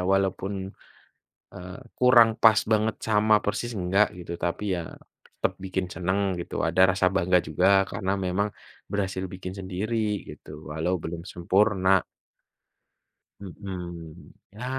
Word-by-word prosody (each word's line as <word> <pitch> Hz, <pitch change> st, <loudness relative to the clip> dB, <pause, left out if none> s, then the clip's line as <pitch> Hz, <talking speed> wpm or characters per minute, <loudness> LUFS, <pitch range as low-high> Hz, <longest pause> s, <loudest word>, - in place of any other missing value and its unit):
walaupun, 95 Hz, 0 st, -1 dB, 0.8 s
eee, 90 Hz, +1 st, -9 dB, 0.2 s
kurang 120 Hz, -3 st, +6 dB
pas 110 Hz, -2 st, +7 dB
banget 110 Hz, 0 st, +2 dB
sama 110 Hz, 0 st, +4 dB
persis 120 Hz, -2 st, -2 dB
enggak 95 Hz, +3 st, +2 dB
gitu. 85 Hz, -1 st, -7 dB
Tapi 85 Hz, +4 st, -2 dB
ya, 85 Hz, -2 st, -4 dB, 0.5 s
tetap -, -, 0 dB
bikin 95 Hz, 0 st, -2 dB
senang 95 Hz, +2 st, -1 dB
gitu, 85 Hz, -, -3 dB
ada 85 Hz, +3 st, +2 dB, 0.2 s
rasa 95 Hz, -, +3 dB
bangga 90 Hz, -1 st, +3 dB
juga, 95 Hz, +6 st, +3 dB
karena 100 Hz, 0 st, -2 dB
memang 100 Hz, +3 st, 0 dB, 0.4 s
berhasil 95 Hz, -2 st, -2 dB
bikin 95 Hz, 0 st, -7 dB
sendiri, 105 Hz, +3 st, -2 dB
gitu, 75 Hz, 0 st, -10 dB
walau 90 Hz, +4 st, 0 dB
belum 85 Hz, 0 st, -6 dB
sempurna 95 Hz, +1 st, +2 dB, 1.4 s
mhm, 90 Hz, -4 st, -8 dB, 0.2 s
ya, 110 Hz, +5 st, -10 dB
95 Hz, 120 wpm, -26 LUFS, 90-105 Hz, 1.4 s, pas